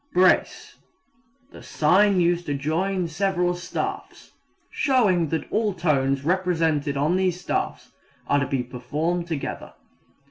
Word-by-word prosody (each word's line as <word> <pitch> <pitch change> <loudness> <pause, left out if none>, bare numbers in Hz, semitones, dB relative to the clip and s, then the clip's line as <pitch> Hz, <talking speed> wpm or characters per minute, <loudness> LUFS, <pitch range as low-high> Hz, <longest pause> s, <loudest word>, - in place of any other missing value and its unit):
Brace 185 +1 +2 0.7
the - - -12
sign 190 +5 +3
used 175 0 +1
to 145 - -1
join 170 +6 -1
several 180 +1 0
staffs, 175 0 -6 0.4
showing 210 - +2
that 160 - -2
all 215 -3 0
tones 140 -5 +1
represented 165 -5 0
on 150 +6 +1
these 185 -2 0
staffs 180 - -3 0.3
are 145 - +2
to 140 - -1
be 135 -2 -1
performed 150 +8 -3
together. 160 -5 -5
170 Hz, 120 wpm, -24 LUFS, 145-185 Hz, 0.7 s, sign